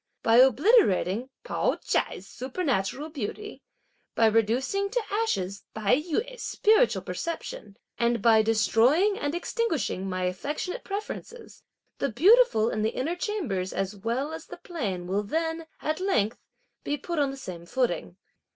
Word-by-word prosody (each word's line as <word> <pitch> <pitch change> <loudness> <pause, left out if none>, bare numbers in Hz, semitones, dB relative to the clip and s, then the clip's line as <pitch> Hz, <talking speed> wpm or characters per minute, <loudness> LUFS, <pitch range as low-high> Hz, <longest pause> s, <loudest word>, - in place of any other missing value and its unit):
By 230 0 +5
obliterating 255 - +4
Pao - - 0
ch'ai's 185 - -2
supernatural 260 - -2
beauty, 315 - -6 0.5
by 225 - +4
reducing 235 - +1
to 480 +2 -1
ashes 200 - -1
Tai 215 +2 +3
yü's 445 +10 -3
spiritual 440 +3 +3
perception, 225 - -5 0.2
and 235 0 +2
by 220 0 +5
destroying 230 - +3
and 290 +2 -2
extinguishing 320 - -1
my 185 0 -2
affectionate 290 - -3
preferences, 430 +3 -7 0.4
the 275 - 0
beautiful 320 - +5
in 215 - -2
the 215 - +2
inner 315 +7 -1
chambers 280 - -2
as 195 +2 -2
well 235 +9 -2
as 320 - -8
the - - -9
plain 205 - -4
will 195 +3 0
then, 325 +8 -2 0.2
at 310 +2 -1
length, 305 - 0 0.4
be 290 - -1
put 335 +3 -3
on 285 -1 +2
the 270 - -6
same 175 -9 -8
footing. 175 - -1
265 Hz, 140 wpm, -27 LUFS, 210-355 Hz, 0.5 s, By